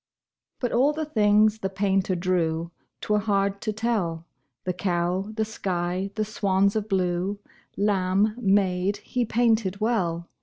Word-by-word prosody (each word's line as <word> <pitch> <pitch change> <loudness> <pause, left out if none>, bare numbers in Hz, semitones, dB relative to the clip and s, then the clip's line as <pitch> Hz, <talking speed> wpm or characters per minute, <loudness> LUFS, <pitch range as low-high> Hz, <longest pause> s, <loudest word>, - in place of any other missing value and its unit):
But 245 - -1
all 270 +5 +3
the 315 +1 -3
things 215 -4 +3
the 195 - -2
painter 195 -1 0
drew 170 -2 0 0.3
'Twere 210 0 +1
hard 200 -1 0
to 215 - -1
tell 205 -7 -1 0.4
The 180 - -1
cow, 180 +2 -1
the 220 -1 0
sky, 185 -2 -2
the 215 -1 0
swans 200 -1 +1
of 215 0 -2
blue, 185 +1 0 0.4
Lamb, 200 +1 +2
maid, 195 -2 +2
he 240 +3 -2
painted 220 -4 +1
well. 180 -7 0
200 Hz, 140 wpm, -25 LUFS, 185-215 Hz, 0.4 s, all